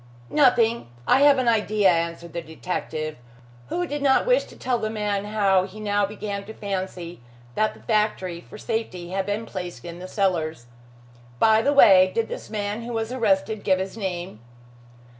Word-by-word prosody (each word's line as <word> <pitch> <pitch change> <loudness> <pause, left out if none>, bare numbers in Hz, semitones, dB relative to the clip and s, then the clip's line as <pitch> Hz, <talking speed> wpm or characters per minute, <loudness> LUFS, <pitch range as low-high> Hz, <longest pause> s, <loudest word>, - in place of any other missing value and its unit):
"Nothing. 235 - +3 0.2
I 265 - +5
have 285 -1 +6
an 255 -2 0
idea," 215 -3 +3
answered 170 0 -2
the 170 - -3
detective, 160 -2 -4 0.5
who 355 - -1
did 290 -3 -4
not 275 -1 +3
wish - - +3
to - - -15
tell 250 -2 -1
the 215 - -2
man 210 -2 -2
how 200 -3 +2
he 205 +3 -12
now 205 -1 +1
began 200 -1 -5
to 220 +2 -10
fancy 185 - -5 0.3
that 215 - 0
the - - -17
factory 210 -6 0
for 210 - -12
safety 215 -6 -4
had 195 +1 -2
been 205 +2 -2
placed 180 -2 -7
in 170 0 -8
the 185 - -7
cellars. 165 - -1 0.7
"By 220 - +5
the 280 - +2
way, 190 -9 +7
did 230 -1 0
this - - -7
man 210 +1 -3
who 235 +1 -6
was 225 +1 -2
arrested 215 -4 0
give 190 -1 +3
his 190 +2 -4
name?" 180 - -4
205 Hz, 180 wpm, -24 LUFS, 185-225 Hz, 0.7 s, way